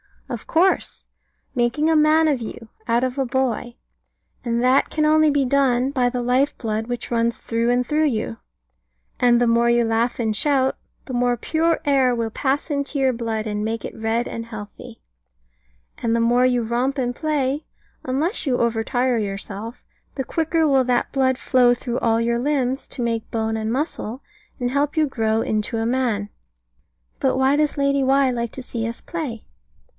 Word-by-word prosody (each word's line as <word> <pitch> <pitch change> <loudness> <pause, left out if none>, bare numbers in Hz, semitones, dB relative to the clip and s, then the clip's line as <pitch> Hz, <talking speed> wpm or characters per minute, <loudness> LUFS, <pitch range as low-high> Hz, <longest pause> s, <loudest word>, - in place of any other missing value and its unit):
Of - - -6
course. 360 +4 +1 0.5
Making 250 +5 +1
a 325 - +3
man 310 +1 +4
of 285 -4 +1
you, 225 0 -8 0.2
out 235 +1 +2
of 260 +1 -2
a 270 - +1
boy. 245 -2 -1 0.7
And 235 0 0
that 255 +2 +3
can 305 -1 0
only 310 0 +5
be 285 -1 +2
done 265 -1 +2
by 250 -3 +1
the 245 0 -3
life 255 +4 +1
blood 220 -1 -3
which 245 -1 -5
runs 235 0 0
through 230 +1 -1
and 245 +1 +2
through 305 +4 +1
you. 215 - -1 0.8
And 240 -1 +4
the 245 - +3
more 235 0 +3
you 235 0 +3
laugh 230 +2 0
and 220 -2 0
shout, 265 0 +2 0.3
the 260 - -7
more 245 0 +2
pure 325 +7 0
air 265 -3 +3
will 230 -1 -1
pass 275 +6 -1
into 280 +1 -2
your 265 -1 +3
blood, 225 -2 -3
and 210 -1 -2
make 225 +1 -3
it - - -7
red 225 +2 -1
and 230 - -5
healthy; 210 - -10 1.0
and 230 -1 +1
the 230 - +2
more 240 +2 +3
you 245 -2 +2
romp 245 +5 -1
and 245 -2 -1
play 295 -1 -1 0.4
unless 300 - -1
you 250 -2 +2
overtire 235 +2 +1
yourself 200 +3 -6 0.3
the 265 - -2
quicker 320 +3 0
will 270 -3 +3
that 245 -1 0
blood 260 -2 +1
flow 250 -2 +4
through 245 0 -3
all 230 0 +2
your 235 0 0
limbs, 265 -1 -1
to 245 - -5
make 230 -1 -2
bone 220 -1 -1
and 220 0 -2
muscle, 260 -2 -3 0.4
and 245 -1 -1
help 285 +2 0
you 315 - +4
to 300 - 0
grow 225 -3 0
into 215 +2 -1
a 225 - -1
man. 235 -4 0 0.9
But - - +1
why 265 +2 +3
does 300 0 +1
Lady 280 0 +2
Why 270 0 +3
like 235 -2 -3
to 265 - -6
see 230 -2 -3
us 230 - -6
play? 285 -10 -5
245 Hz, 185 wpm, -22 LUFS, 230-275 Hz, 1.0 s, only